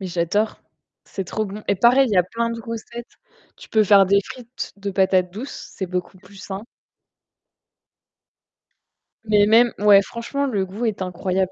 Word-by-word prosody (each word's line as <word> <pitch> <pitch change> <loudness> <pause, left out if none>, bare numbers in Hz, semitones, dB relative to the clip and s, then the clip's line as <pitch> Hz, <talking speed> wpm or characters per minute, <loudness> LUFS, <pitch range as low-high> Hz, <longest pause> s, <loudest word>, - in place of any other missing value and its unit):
mais 190 - -5
j'adore. 180 +5 -1 0.4
C'est 195 - -6
trop 215 +4 -3
bon 210 +1 -8
et - - +3
pareil, 245 +7 +4
il 215 - -3
y - - +2
a 180 - +6
plein 230 +6 -3
de 230 0 -5
recettes. 230 +1 -7 0.5
Tu - - -14
peux 215 -1 +3
faire 195 -1 +6
des 200 +1 +4
frites 250 0 -8
de 200 0 -5
patates 185 -1 +2
douces, 245 +8 -8
c'est 190 - -3
beaucoup 180 +1 -5
plus 200 +1 -18
sain. 195 +1 -7 2.6
Mais 210 -1 +4
même 230 +2 +5
ouais, 205 -1 +6
franchement, 235 +7 -4
le 205 -8 -1
goût 205 +6 -5
est 215 -4 -2
incroyable. 185 +1 -2
205 Hz, 170 wpm, -21 LUFS, 190-230 Hz, 2.6 s, a